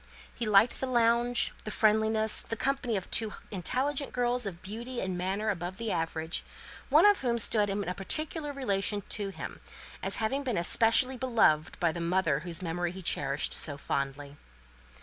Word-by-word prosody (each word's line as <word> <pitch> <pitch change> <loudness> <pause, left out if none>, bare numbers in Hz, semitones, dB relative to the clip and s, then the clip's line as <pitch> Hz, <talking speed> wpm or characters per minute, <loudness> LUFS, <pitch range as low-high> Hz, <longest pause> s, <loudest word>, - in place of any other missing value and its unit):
He 235 - -3
liked 210 +3 +4
the 265 - -2
lounge, 240 0 +2
the - - -5
friendliness, 220 0 +3
the 225 - -4
company 255 -2 0
of 190 - -7
two 220 -2 +2 0.2
intelligent 260 - -1
girls 245 -2 0
of 175 -3 -7
beauty 235 +5 -6
and 185 -1 -2
manners 195 +4 -1
above 175 +1 -6
the 230 -1 -3
average; 165 0 -2 0.5
one - - +6
of 410 -1 +6
whom 240 -2 0
stood 210 -2 +3
in 200 -1 -2
a 180 - -1
peculiar 295 - -3
relation 205 -6 -1
to 205 -2 -3
him, 195 - -8 0.4
as - - -2
having 265 +6 -1
been 250 -6 -1
especially 230 +8 +3
beloved 220 -12 +2
by 170 -2 +2
the 170 - -5
mother 170 -4 +1
whose 170 +2 -4
memory 175 +1 -2
he 190 0 -9
cherished 140 -2 0
so 145 -2 -3
fondly. 140 +1 -3
210 Hz, 170 wpm, -29 LUFS, 175-240 Hz, 0.5 s, one